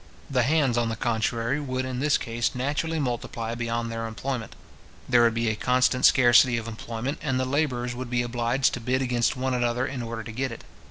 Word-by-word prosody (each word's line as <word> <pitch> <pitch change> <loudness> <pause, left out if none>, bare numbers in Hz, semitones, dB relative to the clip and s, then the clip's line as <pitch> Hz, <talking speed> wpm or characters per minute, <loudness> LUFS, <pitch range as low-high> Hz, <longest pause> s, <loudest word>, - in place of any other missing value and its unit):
The 130 -2 +3
hands, 135 -2 +2
on 115 -1 0
the 115 - -2
contrary, 115 +3 -1
would, 130 -2 -3
in 130 -1 -4
this 145 +1 +3
case, 115 +2 -2
naturally 150 +5 -1
multiply 120 -3 -3
beyond 115 0 -2
their 115 0 -3
employment. 120 +1 -4 0.5
There 120 - +5
would 115 -1 +3
be 115 0 0
a 110 - +1
constant 125 +2 +2
scarcity 120 -1 +6
of 115 -1 -5
employment, 115 +4 -5
and 135 -4 0
the 130 - 0
labourers 130 -3 -1
would 125 0 -6
be 120 0 +1
obliged 120 +2 0
to - - -3
bid 130 +3 0
against 125 -1 0
one 130 0 -1
another 120 +1 0
in 135 -2 -4
order 115 -1 -5
to 110 - -8
get 130 +3 -2
it. 115 - -9
120 Hz, 210 wpm, -26 LUFS, 115-130 Hz, 0.5 s, scarcity